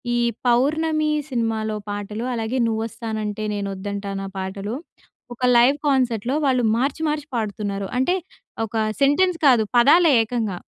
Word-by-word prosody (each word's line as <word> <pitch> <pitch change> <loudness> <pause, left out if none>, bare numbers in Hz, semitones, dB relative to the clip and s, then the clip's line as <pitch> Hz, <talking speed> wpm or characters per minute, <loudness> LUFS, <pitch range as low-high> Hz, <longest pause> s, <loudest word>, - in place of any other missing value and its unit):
ఈ - - +2 0.3
'పౌర్ణమి' 305 +5 +2 0.2
సినిమాలో 225 -3 -1
పాటలు. 205 +2 -4
అలాగే 225 +2 -2
'నువ్వు 220 -1 -1
వస్తానంటే 220 -2 -4
నేనొద్దంటానా' 200 0 -4
పాటలు. 195 +3 -4 0.6
ఒక 245 - -10
లైవ్ 255 +4 +5
కాన్సర్ట్‌లో 250 -2 +1
వాళ్ళు 255 -2 +2
మార్చి 270 +5 -1
మార్చి 300 -1 -3
పాడుతున్నారు. 200 -3 -3
అంటే 265 +8 +2 0.5
ఒక 220 - -10 0.3
సెంటెన్స్ 335 +6 +3
కాదు 240 -4 +5
పదాలే 305 +6 +6
ఏకంగా. 220 -4 -2
230 Hz, 125 wpm, -22 LUFS, 205-270 Hz, 0.6 s, పదాలే